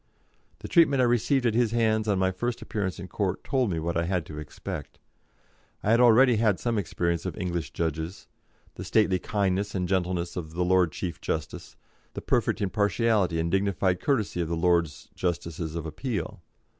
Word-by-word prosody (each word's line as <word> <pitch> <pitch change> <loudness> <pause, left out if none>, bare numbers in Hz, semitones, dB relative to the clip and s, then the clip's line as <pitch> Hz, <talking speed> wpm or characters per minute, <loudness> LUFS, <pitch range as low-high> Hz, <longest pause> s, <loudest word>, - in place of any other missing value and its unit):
The - - -6
treatment 155 -6 +4
I 125 - +5
received 120 +2 +2
at 115 - +2
his 115 -1 +2
hands 110 -2 +2
on 100 -2 +2
my 95 0 +2
first 120 +6 -3
appearance 95 -4 -3
in 90 - -7
court 95 0 -2
told 130 -5 +1
me 85 - -2
what 85 +1 -2
I 85 0 +1
had 90 -2 -1
to 75 0 -8
expect. 75 -1 -7 0.9
I 105 - +2
had 115 - +5
already 120 0 +6
had 105 -4 +2
some 115 -3 0
experience 85 -3 -1
of - - -5
English 85 -3 -3
judges, 80 +2 -3 0.5
the 90 - -7
stately 95 -1 +2
kindness 100 0 -1
and 90 -2 -1
gentleness 90 -2 -1
of 80 -3 -6
the 90 0 0
Lord 90 -2 +3
Chief 85 0 -5
Justice, 80 0 -4 0.4
the - - -4
perfect - - 0
impartiality 100 -2 +1
and 85 +1 -1
dignified 95 -1 +1
courtesy 110 -10 0
of 85 - -2
the 85 - -1
Lords 85 -3 +1
Justices 85 -2 -3
of 85 -1 -4
Appeal. 105 - -4
95 Hz, 180 wpm, -27 LUFS, 85-110 Hz, 0.9 s, already